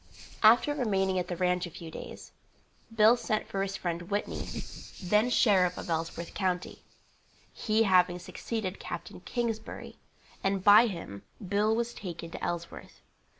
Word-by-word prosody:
After 235 +7 +6
remaining 195 -8 +1
at 180 - -3
the 175 - -3
ranche 180 0 0
a - - -8
few 165 0 -10
days, - - -9 0.6
Bill 225 +1 +6
sent 220 -3 -2
for 195 - -3
his 195 0 -2
friend 175 0 -4
Whitney, 205 0 -2 0.6
then 210 +6 +3
sheriff 190 -7 +3
of - - -5
Ellsworth 165 +1 -3
county, 180 -2 -2 0.7
he 220 0 +1
having 180 -3 +4
succeeded 185 +2 -5
Capt. 175 0 -6
Kingsbury, 235 -3 -4 0.5
and 195 -1 0
by 210 +4 +8
him 165 - -7 0.3
Bill 210 +3 +2
was 235 +1 -1
taken 170 -3 -7
to - - -8
Ellsworth. 170 -1 -5
190 Hz, 145 wpm, -29 LUFS, 175-215 Hz, 0.7 s, by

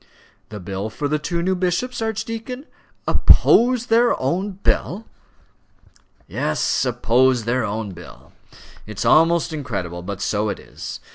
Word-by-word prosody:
"The 105 - -7
bill 95 +3 -4
for 110 +8 -3
the 150 +1 0
two 170 +3 -2
new 190 +1 +1
bishops, 185 +7 -1
archdeacon? 225 +4 -4 0.4
oppose 245 0 +5
their 235 0 +3
own 185 +9 -1
bill!" 195 +2 -1 1.2
"Yes 75 - 0
oppose 125 +1 +2
their 120 +1 0
own 105 -1 -3
bill. 85 -1 -13 0.6
It 110 -2 -9
is - - -2
almost 165 +1 +4
incredible; 100 - -4
but 100 +2 -6
so 105 +1 0
it - - -3
is. - - -8
150 Hz, 135 wpm, -21 LUFS, -, 1.2 s, oppose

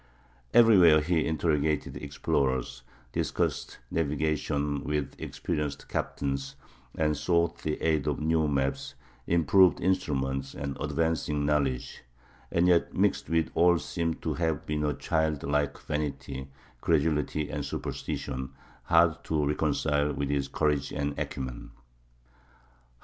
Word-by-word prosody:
Everywhere 95 -9 +7
he 80 +1 +1
interrogated 80 -2 0
explorers, 65 -2 -1 0.3
discussed - - -2
navigation 75 -2 -1
with 75 -2 -2
experienced 75 -2 -3
captains, 70 -1 -3 0.4
and 75 -1 +2
sought 85 +2 +1
the 75 -1 -3
aid 80 -4 +1
of - - 0
new 80 0 +2
maps, 70 -1 -1 0.3
improved 85 0 +4
instruments, 70 -7 -1
and 70 0 -4
advancing 75 -3 0
knowledge; 70 -4 0 0.5
and 85 +1 +3
yet 85 -2 +3
mixed - - +1
with 80 -1 +1
all 85 0 +5
seem 80 -1 -2
to - - -3
have 80 -4 -1
been 75 0 -1
a 75 -1 0
childlike 75 -1 0
vanity, 70 -3 -4 0.3
credulity, 75 -1 +1
and 70 0 -3
superstition, 65 -1 -4 0.3
hard - - +3
to 75 -2 0
reconcile 75 0 +1
with 70 0 -2
his 70 -1 0
courage 70 -1 0
and 70 0 -2
acumen. 65 -2 -5
75 Hz, 115 wpm, -28 LUFS, 70-80 Hz, 0.5 s, Everywhere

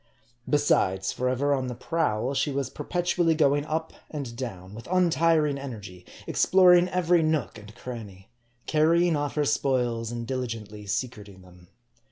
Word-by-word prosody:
Besides, 95 -10 +2
forever 130 +3 0
on 130 -2 -1
the 125 - -5
prowl, 130 -4 -1
she 145 - 0
was 135 -1 -2
perpetually 175 -2 0
going 145 -2 +2
up 160 +1 -3 0.2
and 140 -6 -6
down; 100 -7 -7
with 115 +2 -10
untiring 165 -5 +2
energy, 105 -9 -9 0.2
ex - - +1
ploring 180 -1 +6
every 175 -1 +2
nook 155 -8 -1
and 105 +1 -14
cranny; 105 -7 -9 0.3
carrying 165 +2 +3
off' 145 -1 -2
her 150 -1 +1
spoils 120 -5 0
and 120 0 -5
diligently 115 -5 -5
secreting 105 -3 -5
them. 90 -1 -18
130 Hz, 145 wpm, -26 LUFS, 110-160 Hz, 0.3 s, ploring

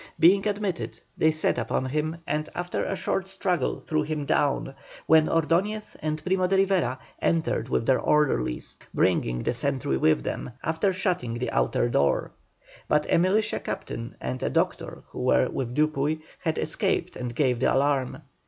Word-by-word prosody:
Being 195 +5 +5
admitted, 205 -4 -2 0.2
they 160 - +3
set 155 -5 +1
upon 120 +2 -1
him, 155 +4 -1
and 150 +1 -2
after 175 0 -2
a 195 - -2
short 190 0 -1
struggle 185 -6 -1
threw 155 -1 -1
him 150 -1 -3
down, 140 -1 +1 0.3
when 160 -1 +5
Ordoñez 180 +7 0
and 155 0 -2
Primo 185 0 +2
de 195 - +2
Rivera 185 -10 +2 0.2
entered 160 -7 0
with 115 - 0
their 130 +1 +3
orderlies, 130 - 0 0.2
bringing - - +1
the - - 0
sentry 130 - 0
with 65 -2 +3
them, 125 - -4
after 160 +5 +1
shutting 180 - -1
the 125 +1 -2
outer - - +1
door. 70 -12 +1 0.6
But 150 0 +2
a - - +5
militia 195 +5 +2
captain 115 0 -5
and 130 - -4
a - - 0
doctor - - -1
who - - -7
were - - +3
with 125 -2 -3
Dupuy, 155 0 +1 0.2
had 160 -3 -1
escaped - - -1
and 120 -2 -5
gave 125 -3 +2
the - - +3
alarm. 135 -1 +1
155 Hz, 165 wpm, -26 LUFS, 130-175 Hz, 0.6 s, Being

